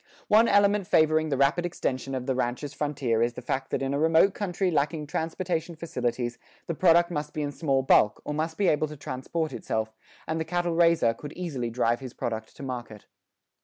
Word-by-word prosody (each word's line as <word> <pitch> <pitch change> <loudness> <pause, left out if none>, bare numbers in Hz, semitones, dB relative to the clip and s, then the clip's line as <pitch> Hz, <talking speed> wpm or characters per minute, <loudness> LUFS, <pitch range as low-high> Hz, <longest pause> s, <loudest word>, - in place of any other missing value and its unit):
One 220 +2 +6
element 205 -1 +3
favoring 155 0 +3
the 135 - 0
rapid 140 +6 +3
extension 135 -6 -3
of 125 -1 -4
the 135 - 0
rancher's 130 +3 -2
frontier 135 -6 -1
is 120 +1 +1
the - - -8
fact 135 0 -2
that - - -1
in 135 +1 -1
a 140 - 0
remote 165 +5 +4
country 190 -2 -1
lacking 150 0 0
transportation 165 +2 -3
facilities 125 -6 -3 0.3
the 170 - -2
product 170 +1 +4
must 150 -2 -4
be 150 - -1
in 145 - -2
small 135 -3 0
bulk, 105 -5 +4
or 150 - -3
must 160 +2 -2
be 200 - +2
able 155 -1 +2
to 150 0 -9
transport 140 +3 -3
itself, 110 -2 -3 0.3
and 160 0 -1
the - - 0
cattle 175 +1 -1
raiser 165 -8 +4
could 145 +5 -9
easily 140 -10 -3
drive 120 0 +1
his 130 -3 -9
product 110 -1 -4
to - - -10
market. 120 -5 -6
150 Hz, 200 wpm, -27 LUFS, 130-170 Hz, 0.3 s, One